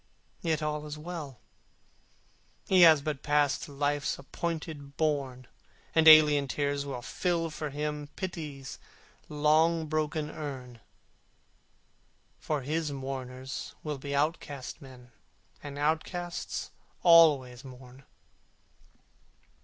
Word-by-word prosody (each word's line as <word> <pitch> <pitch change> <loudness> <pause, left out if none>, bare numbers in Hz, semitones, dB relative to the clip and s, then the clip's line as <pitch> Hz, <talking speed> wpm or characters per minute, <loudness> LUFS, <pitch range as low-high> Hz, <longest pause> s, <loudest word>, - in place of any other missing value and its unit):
Yet 160 -2 0
all 150 0 -3
is 150 0 -6
well; 150 -5 -7 1.3
he 185 -1 +5
has 160 -4 +7
but 150 -2 -3
passed 145 -2 +2
To - - -12
Life's 145 +1 -1
appointed 155 -1 -5
bourne: 140 -5 -1 0.5
And 160 -1 +4
alien 150 -2 +8
tears 140 0 -2
will 125 -3 -5
fill 170 -3 -1
for 155 0 -4
him 150 0 -4
Pity's 150 -7 -6 0.5
long 155 +2 +3
broken 155 0 -2
urn, 130 -5 -7 1.6
For 150 -3 -2
his 155 +2 -2
mourners 130 -1 -6 0.2
be 140 +1 -4
outcast 145 -2 -2
men, 125 -2 -14 0.5
And 145 -1 -8
outcasts 165 +4 -2 0.3
always 150 -7 +6
mourn. 130 0 -13
150 Hz, 100 wpm, -29 LUFS, 140-155 Hz, 1.6 s, alien